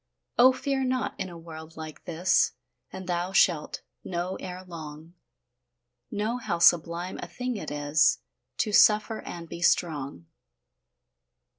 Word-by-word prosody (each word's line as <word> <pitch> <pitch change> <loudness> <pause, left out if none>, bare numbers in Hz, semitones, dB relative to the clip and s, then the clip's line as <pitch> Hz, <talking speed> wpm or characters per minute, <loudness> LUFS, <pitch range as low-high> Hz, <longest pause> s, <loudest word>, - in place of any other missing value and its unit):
Oh, 255 +2 +9
fear 265 +1 -1
not 255 0 -1
in 185 - -3
a 170 - -9
world 160 -1 -11
like 155 -1 -9
this, 175 +1 +2 0.4
And 190 0 -7
thou 180 +1 -2
shalt 170 -5 +2 0.2
know 180 +1 -3
ere 180 0 -7
long, 160 -1 -9 1.0
Know 215 +4 -1
how 200 -8 -2
sublime 170 +1 +3
a - - -6
thing 250 0 -4
it 205 - -5
is 145 0 +3 0.4
To 215 - 0
suffer 215 +2 +5
and 170 -1 -8
be 170 - -8
strong. 145 - +1
175 Hz, 135 wpm, -27 LUFS, 160-205 Hz, 1.0 s, Oh